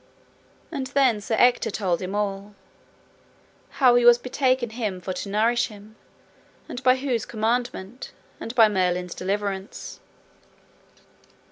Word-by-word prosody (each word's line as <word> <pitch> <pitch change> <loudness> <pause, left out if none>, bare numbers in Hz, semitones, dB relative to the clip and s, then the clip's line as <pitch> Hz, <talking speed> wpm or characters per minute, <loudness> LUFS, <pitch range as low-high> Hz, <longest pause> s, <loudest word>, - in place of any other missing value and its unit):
And 275 -5 -4
then 260 -6 +2
Sir 220 +2 -1
Ector 245 0 +3
told 185 -4 -1
him 190 +2 -4
all, 205 0 -3 1.2
how 260 -3 +6
he 245 0 +4
was 240 0 +8
betaken 255 -1 0
him 215 -5 -3
for 185 +1 -5
to 200 - -6
nourish 225 +4 +2
him, 210 0 -14 0.7
and 245 - -7
by 255 0 +5
whose 255 -4 -2
commandment, 230 0 -3 0.3
and 230 - -7
by 225 -3 +7
Merlin's 180 -3 -1
deliverance. 200 +2 -4
220 Hz, 125 wpm, -24 LUFS, 200-245 Hz, 1.2 s, was